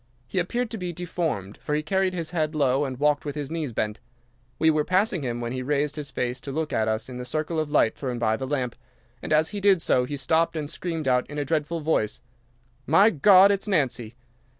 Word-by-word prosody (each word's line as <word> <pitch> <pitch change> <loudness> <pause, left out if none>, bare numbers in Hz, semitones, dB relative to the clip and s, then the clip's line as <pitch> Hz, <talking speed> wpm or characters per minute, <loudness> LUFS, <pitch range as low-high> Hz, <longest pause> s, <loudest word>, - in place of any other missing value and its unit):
He 185 - -1
appeared 235 +7 -1
to 225 - -5
be 180 -1 -3
deformed, 165 - -3
for 150 - -3
he 150 - -1
carried 190 +2 0
his 165 -2 -4
head 155 -2 -1
low 140 -1 +2
and 130 -2 -5
walked 145 0 +2
with 145 -1 -5
his 145 -1 -4
knees 160 -5 -3
bent. 105 -1 -2 0.6
We 160 0 +4
were 155 -1 +1
passing 185 +1 +1
him 120 -3 -3
when 120 0 -3
he 130 0 -3
raised 145 +2 0
his 150 -2 -6
face 125 -1 -3
to 140 - -6
look 155 +2 -2
at 110 0 +1
us 110 0 -1
in 125 -1 -7
the - - -4
circle 155 +5 -2
of 155 -1 -2
light 145 -7 +3
thrown 125 -3 -4
by 110 -2 +1
the 130 +3 -5
lamp, 130 -4 -2 0.5
and - - -6
as 155 +1 +3
he 205 -1 -5
did 195 -2 +5
so 125 -5 +2
he 145 +3 -4
stopped 160 +5 +1
and 150 -2 -3
screamed 165 -4 -4
out 125 -1 +2
in 150 - -7
a 145 - -1
dreadful 160 +2 -1
voice, 145 -9 0 0.7
"My 195 +9 +6
God, 190 +4 +7
it's 200 +1 -1
Nancy!" 125 - 0
150 Hz, 235 wpm, -25 LUFS, 130-165 Hz, 0.7 s, God